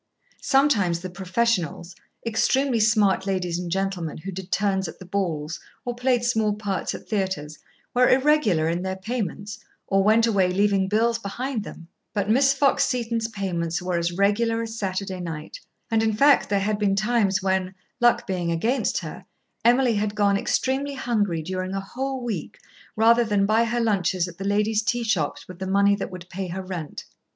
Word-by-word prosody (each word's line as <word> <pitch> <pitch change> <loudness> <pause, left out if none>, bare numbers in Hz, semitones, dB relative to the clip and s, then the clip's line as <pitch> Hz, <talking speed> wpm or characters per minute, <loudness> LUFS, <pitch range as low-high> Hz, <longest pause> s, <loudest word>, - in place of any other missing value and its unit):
Sometimes 215 - +2
the 185 0 -6
"professionals," 185 -2 -1 0.3
extremely 250 +2 +1
smart 210 -3 +3
ladies 180 -3 -1
and 180 -1 -4
gentlemen 190 -4 -2
who 190 +5 -6
did 190 0 -8
turns 195 -2 +1
at 160 - -9
the 185 - -11
balls 165 -5 -2 0.3
or 245 - -2
played 245 0 +1
small 220 -3 +1
parts 205 -2 -3
at - - -10
theatres, 190 -8 -2 0.3
were 250 0 +4
irregular 260 - +3
in 170 +2 -1
their 190 0 -3
payments 205 -1 -4 0.3
or 195 0 +2
went 220 +3 +4
away 195 -5 +2
leaving 195 0 +2
bills 230 +3 +1
behind 235 +3 -4
them; 170 -4 -10 0.3
but 200 -1 0
Miss 270 +4 +5
Fox 275 0 +3
Seton's 230 -3 -1
payments 180 -5 -2
were 180 -1 -2
as 170 0 0
regular 215 +5 +1
as 225 0 -6
Saturday 190 -2 -3
night, 165 - -6 0.3
and, 225 -1 +3
in 220 -1 +1
fact, 280 +6 +4
there 200 -1 +1
had 210 +1 -1
been 200 -2 +2
times 205 -2 +1
when, 190 -1 0 0.2
luck 240 -1 +3
being 180 -3 -2
against 225 +11 0
her, - - -8 0.4
Emily 245 +1 +4
had 210 0 -1
gone 200 -1 +3
extremely 270 +7 -1
hungry 205 -10 -1
during 185 +2 -3
a - - -1
whole 260 +6 -4
week 210 -10 -4 0.4
rather 230 +2 +5
than 205 -3 +1
buy 220 +3 +3
her 240 +1 -1
lunches 190 -5 +1
at 175 0 -11
the 195 - -4
ladies' 210 +2 +1
tea 235 +3 -1
shops 185 -10 -1
with 185 -1 -11
the 190 - -4
money 200 +1 +4
that 200 - -4
would 180 -2 -9
pay 190 0 -5
her 185 +2 -5
rent. 175 -5 -6
200 Hz, 180 wpm, -24 LUFS, 185-230 Hz, 0.4 s, Miss